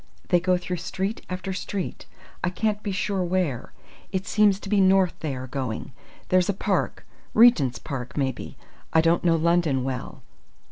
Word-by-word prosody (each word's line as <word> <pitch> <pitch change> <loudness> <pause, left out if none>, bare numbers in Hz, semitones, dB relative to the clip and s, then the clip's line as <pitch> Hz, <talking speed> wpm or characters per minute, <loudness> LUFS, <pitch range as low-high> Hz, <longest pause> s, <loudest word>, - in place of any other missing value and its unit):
They 175 - +5
go 180 +1 +2
through 180 0 -4
street 190 +5 -3
after 185 +1 -4
street! 190 0 -5 0.4
I 180 - +2
can't 210 +3 -1
be 205 - -3
sure 195 -1 -1
where. 175 -9 -1 0.4
It 190 0 -2
seems 205 -2 +3
to - - -8
be 200 0 +3
north 190 -1 +4
they 150 -4 -3
are 130 0 -5
going. 130 -2 -4 0.4
There's 185 0 +3
a 200 - +1
park - - -1 0.3
Regent's 175 - +6
Park, 130 -4 -6
maybe. 135 -2 -2 0.4
I 160 - +6
don't 165 +1 +2
know 170 -2 +4
London 165 -5 +2
well. 130 -1 -5
180 Hz, 170 wpm, -25 LUFS, 145-195 Hz, 0.4 s, Regent's